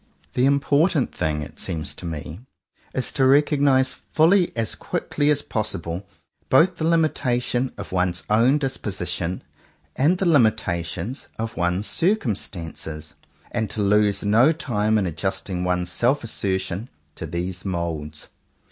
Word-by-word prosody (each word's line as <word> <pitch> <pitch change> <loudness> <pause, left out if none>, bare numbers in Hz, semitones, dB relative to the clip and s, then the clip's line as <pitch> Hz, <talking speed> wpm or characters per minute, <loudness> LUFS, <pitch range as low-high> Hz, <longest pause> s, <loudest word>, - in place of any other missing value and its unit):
The 125 - +2
important 140 +2 +2
thing, 75 -3 -1
it 75 +1 -11
seems 80 -4 -3
to 90 - -7
me, 80 +1 -6 0.5
is 130 - -2
to 135 - 0
recognize 140 -1 +4
fully 175 +3 +3
as 115 -2 -1
quickly 145 0 -1
as 145 -1 +2
possible 95 -4 -3 0.4
both 170 +6 +4
the 160 - 0
limitations 130 -6 +1
of - - -7
one's 90 -1 +1
own 115 +7 +4
disposition 95 - -3 0.5
and 160 +7 +3
the 190 - -1
limitations 110 - +1
of 115 0 -4
one's 90 +4 0
circumstances, 90 - -2 0.4
and 110 -3 -1
to 105 +1 -2
lose 105 0 +3
no 115 +8 +5
time 110 -9 0
in 100 - +1
adjusting 90 +2 -2
one's 90 -1 0
self 120 +9 +1
asser 100 -4 -1
tion 95 +6 -5 0.2
to - - -6
these 90 +1 -4
moulds. 80 -5 -4
105 Hz, 135 wpm, -23 LUFS, 90-135 Hz, 0.5 s, no